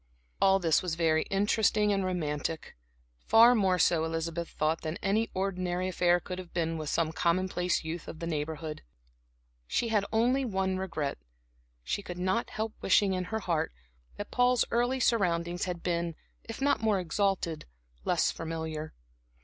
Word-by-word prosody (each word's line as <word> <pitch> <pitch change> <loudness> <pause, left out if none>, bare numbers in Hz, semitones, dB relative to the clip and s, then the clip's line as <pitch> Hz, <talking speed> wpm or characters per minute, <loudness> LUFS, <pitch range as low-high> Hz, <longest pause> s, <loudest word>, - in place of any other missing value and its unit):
All 195 0 +6
this 165 -5 +2
was 180 -3 -2
very 160 -1 +2
interesting 210 +1 +2
and 195 -1 0
romantic; 160 -3 -3 0.5
far 230 +2 +8
more 190 -5 +2
so, 165 -1 +3
Elizabeth 165 +1 -3
thought, 155 +2 -1
than 160 +2 -4
any 215 +3 +1
ordinary 185 -1 -1
affair 175 -1 +3
could 180 +1 -6
have 180 -2 -9
been, 165 -1 -1
with 155 -2 -4
some 160 -1 +1
commonplace 180 +1 0
youth 160 +1 -5
of - - -7
the 170 - -5
neighborhood. 155 -1 -4 0.9
She 235 - 0
had 210 -3 +2
only 245 +5 +2
one 190 -5 -1
regret; 155 - -3 0.6
she 65 - -2
could 180 -3 -7
not 185 +6 0
help 220 0 -3
wishing 195 0 +3
in 185 0 -2
her 220 +4 -3
heart 165 - -1 0.4
that 205 - -6
Paul's 245 -1 +3
early 245 +3 +1
surroundings 175 -7 +1
had 175 -2 -5
been, 170 -2 -1 0.3
if 225 - -7
not 285 -4 +2
more 215 -3 +2
exalted, 180 -2 -1 0.4
less - - +2
familiar. 160 -1 -5
180 Hz, 155 wpm, -30 LUFS, 165-200 Hz, 0.9 s, far